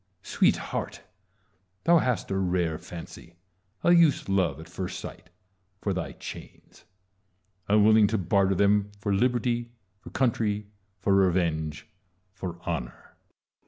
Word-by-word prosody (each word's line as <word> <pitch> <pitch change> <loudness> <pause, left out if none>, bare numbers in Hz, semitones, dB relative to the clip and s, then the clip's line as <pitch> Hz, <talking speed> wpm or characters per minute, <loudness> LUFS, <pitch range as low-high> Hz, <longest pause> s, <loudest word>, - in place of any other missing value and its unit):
Sweetheart! - - 0 0.8
thou 170 +1 +5
hast 125 -8 -1
a - - 0
rare 90 -4 0
fancy, 85 0 -10 0.5
a 175 - +5
youth's 170 -5 +4
love 95 -7 +1
at 80 - -10
first 90 +1 -5
sight, - - -10 0.5
for 100 - -1
thy 90 -2 -4
chains: - - -11 0.8
unwilling 105 +1 +5
to 110 - 0
barter 95 +1 +2
them 100 +1 +3
for 100 0 -2
liberty, 120 +2 +1 0.3
for - - -11
country, 110 -5 0 0.3
for 100 +1 +1
revenge, 85 -6 +1 0.5
for 90 -3 -6
honour. - - -5
100 Hz, 120 wpm, -27 LUFS, 90-110 Hz, 0.8 s, thou